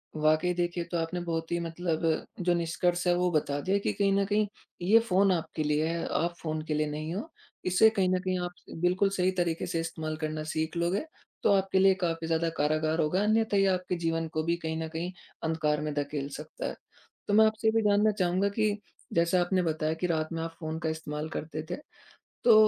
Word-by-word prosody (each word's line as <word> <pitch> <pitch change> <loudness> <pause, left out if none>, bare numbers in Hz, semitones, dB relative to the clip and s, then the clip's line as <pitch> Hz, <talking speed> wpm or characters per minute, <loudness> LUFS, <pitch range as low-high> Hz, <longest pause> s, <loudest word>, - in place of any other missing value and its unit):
वाक़ई 155 +3 +3
देखिए 175 0 -1
तो 175 - 0
आपने 165 +2 -2
बहुत 165 -1 -3
ही 170 - +1
मतलब 165 -1 -2 0.4
जो 180 -1 +2
निष्कर्ष 175 +1 0
है 175 - +5
वो 180 0 +2
बता 145 -2 0
दिया 190 +6 +1
कि - - -1
कहीं 200 -1 +2
न 200 0 +2
कहीं 210 +1 +1 0.3
ये 210 +6 +6
फ़ोन 195 -3 +3
आपके 165 -2 -1
लिए 150 +1 +1
है, 165 0 -2
आप 170 +2 0
फ़ोन 155 -1 -2
के 155 - -2
लिए 150 0 +1
नहीं 155 +2 -4
हो। 255 +12 -4 0.4
इसे 185 +4 +6
कहीं 195 -4 +1
न 185 0 +2
कहीं 185 0 -1
आप 175 - -5 0.2
स - - -8
बिल्कुल 185 +3 +3
सही 185 -1 +1
तरीके 170 -2 0
से 165 - -1
इस्तेमाल 160 -1 -3
करना 155 -1 -3
सीख 160 +2 -2
लोगे 175 - 0 0.4
तो 200 - +5
आपके 195 -1 +2
लिए 190 0 +6
काफ़ी 165 -2 -1
ज़्यादा 165 0 +1
कारागार 155 +2 +1
होगा 165 +5 +1
अन्यथा 215 0 +2
ये 195 - +4
आपके 185 -1 0
जीवन 165 -1 0
को 155 0 0
भी 170 +1 +1
कहीं 160 0 -2
न 160 - -3
कहीं 170 +3 -3 0.3
अंधकार 155 -2 0
में 150 -1 -2
धकेल 145 -1 -2
सकता 150 +1 -6
है। - - -5 0.5
तो 205 - 0
मैं 220 +1 +7
आपसे 220 0 +1
ये - - +6
भी 225 - +4
जानना 205 +1 +4
चाहूँगा 185 +2 +2
कि 210 0 0 0.4
जैसा 170 +2 +3
आपने 185 +1 +1
बताया 155 -1 0
कि 170 +2 -2
रात 160 -2 0
में 165 - -2
आप 165 0 -6
फ़ोन 160 0 -4
का 160 - +1
इस्तेमाल 155 -1 -4
करते 155 0 -5
थे। - - -1 0.7
तो 235 - +8
170 Hz, 220 wpm, -29 LUFS, 160-185 Hz, 0.7 s, तो